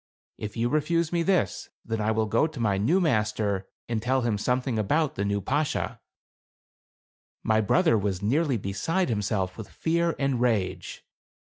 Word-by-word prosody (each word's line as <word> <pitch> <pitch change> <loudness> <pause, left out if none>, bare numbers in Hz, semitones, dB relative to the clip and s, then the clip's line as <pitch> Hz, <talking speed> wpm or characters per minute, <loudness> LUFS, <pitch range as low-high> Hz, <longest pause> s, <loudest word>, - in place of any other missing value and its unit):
If 105 +2 -6
you 115 +1 +1
refuse 155 +4 0
me 170 - +2
this, 175 - 0 0.2
then 110 -1 -2
I 105 - +1
will 110 0 +1
go 110 +8 +2
to 155 -5 -9
my 100 -4 +1
new 155 - +3
master 105 - 0 0.2
and 115 -2 -1
tell 130 +3 +1
him 115 -3 0
something 125 +1 0
about 150 +9 +1
the 100 - -2
new 100 0 0
Bashaw." 145 +7 -1 1.5
My 110 0 +3
brother 115 - +3
was 100 -2 -1
nearly 135 - +1
beside 110 - -1
himself 105 -3 -1
with 110 - -7
fear 170 +1 0
and 135 -3 0
rage. 110 -7 -1
115 Hz, 160 wpm, -26 LUFS, 105-155 Hz, 1.5 s, new